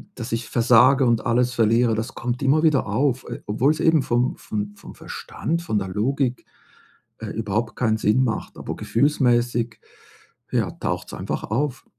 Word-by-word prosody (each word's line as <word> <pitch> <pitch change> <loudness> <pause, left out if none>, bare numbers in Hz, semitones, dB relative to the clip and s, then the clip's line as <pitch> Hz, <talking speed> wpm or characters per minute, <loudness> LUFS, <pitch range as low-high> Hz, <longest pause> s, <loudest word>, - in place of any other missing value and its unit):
dass 115 -1 -6
ich 115 0 -2
versage 125 +3 +5
und 115 -2 +1
alles 125 +1 +2
verliere, 115 0 +3
das 110 +4 -4
kommt 120 +2 -3
immer 145 +4 +3
wieder 150 -5 +3
auf, 130 -2 0
äh, - - -6
obwohl's 135 +9 +1
eben 160 -4 +3
vom 120 +2 0
vom 105 -1 -5
vom - - -12
Verstand, 170 +2 -4
von 110 -11 0
der 95 - -4
Logik, 125 +6 -1 0.7
äh, - - -6
überhaupt 110 +1 -2
keinen 110 -3 +1
Sinn 110 +5 +2
macht, 115 -4 -3
aber - - -5
gefühlsmäßig, 120 -3 +1 0.7
ja, - - +1
taucht's - - -4
einfach - - -4
auf. 130 +4 -2
120 Hz, 160 wpm, -23 LUFS, 115-135 Hz, 0.7 s, versage